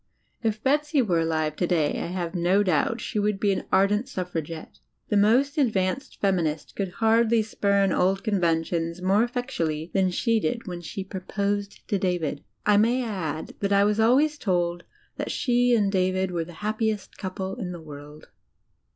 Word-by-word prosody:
If 220 -2 -1
Betsy 295 +2 +2
were 175 -7 +1
alive 155 -2 0
today, 170 -4 +1
I - - -3
have 175 -1 -3
no 180 +3 +2
doubt, 185 +6 +1
she 210 - -2
would 205 -1 0
be 205 0 +2
an - - -4
ardent 205 +5 +3
suffragetre. 165 - -5 0.3
The 210 - +2
most 260 +9 +3
advanced 215 -1 0
feminist 170 -6 -1
could 195 -3 -3
hardly 225 +1 +3
spurn 200 -2 +1
old 190 +2 +1
conventions 170 -4 0
more 195 +4 +3
effectually 180 -11 -3
than 190 -1 +3
she 225 +5 +1
did 235 +1 -2
when 175 -2 -6
she 190 +3 -5
proposed 200 +1 -3
to 200 - 0
David. 175 -6 -1 0.2
I 210 -1 +5
may 240 +4 +3
add 170 -9 -4
that 200 0 -1
I 200 0 +5
was 210 +1 +1
always 285 +7 +3
told 175 -3 -1 0.3
that - - -3
she 245 -1 +2
and 205 -3 +2
David 185 -1 +1
were 170 -2 -2
the 175 - -11
happiest 215 -1 -2
couple 190 +1 -4
in 190 -7 -4
the 175 - -7
world. 150 -1 -11
195 Hz, 170 wpm, -25 LUFS, 175-220 Hz, 0.3 s, I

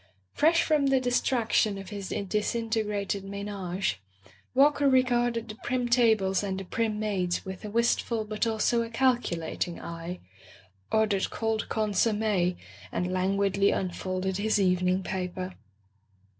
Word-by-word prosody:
Fresh 330 +3 +4
from 300 -3 +2
the 270 -1 +4
distraction 240 -4 +1
of 195 -1 -8
his 200 -2 -5 0.2
disintegrated 210 -1 -1
menage, 195 - -3 0.5
Walker 285 +1 +5
regarded 240 -3 +2
the 215 - -6
prim 250 +2 -2
tables 220 -6 +3
and 195 -2 -3
the - - -5
prim 215 +2 -1
maids 190 -5 -1
with 190 +1 -7
a 210 - -5
wistful 230 0 +1
but 215 +2 -1
also 225 +1 +1
a 230 - -4
calculat 230 -11 0
ing 175 - -7
eye, 170 +2 -6 0.7
ordered 215 -3 +2
cold 225 -1 -2
consomme, 210 -3 +1 0.4
and 180 +1 -2
lan 185 +2 +1
guidly 200 0 +2
unfolded 185 0 -2
his 215 +1 +1
evening 185 0 +2
paper. 185 0 -4
210 Hz, 130 wpm, -28 LUFS, 190-230 Hz, 0.7 s, Walker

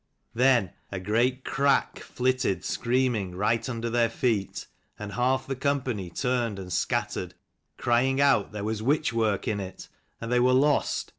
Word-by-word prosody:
Then 120 -6 +3 0.2
a 95 - -3
great 120 +7 0
crack 140 -1 +1
flitted 125 -8 -1
scream 125 +1 +1
ing 95 -5 -4
right 110 +6 0
under 115 -1 -3
their 115 0 +2
feet, 110 -4 -1 0.3
and 105 -1 -7
half 130 +2 +1
the 135 - -3
company 130 -8 -1
turned 120 +1 -1
and 90 -2 -6
scattered, - - -2 0.4
crying 130 +3 +2
out 140 -7 +3
there 105 -1 -5
was 110 0 -2
witch 145 +3 +1
work 110 -3 0
in 105 -2 0
it, 95 -1 -8 0.3
and 115 +1 -5
they 125 - +3
were 125 +1 +4
lost. 140 +3 +2
120 Hz, 160 wpm, -27 LUFS, 105-130 Hz, 0.4 s, were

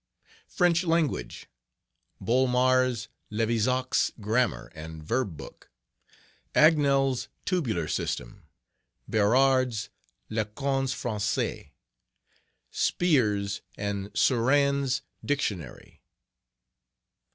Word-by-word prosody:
French 175 -1 +2
Language...........Bolmar's 125 - -1 0.2
Levizac's 115 +4 +1
Grammar 110 +4 0
and 80 -1 -9
Verb 110 - -1
Book. - - -12 0.9
Agnel's 140 -4 +4 0.2
Tabular 115 - -1
System. 60 -4 -3 0.7
Berard's 125 +1 +2 0.4
Lecons 135 +5 -1
Francaises. 105 -5 -2 1.0
*Spier's 105 - +1 0.2
and 100 0 -3
Surenne's 135 +1 +2 0.2
Dictionary. 100 - -3
125 Hz, 60 wpm, -27 LUFS, 105-135 Hz, 1.0 s, Agnel's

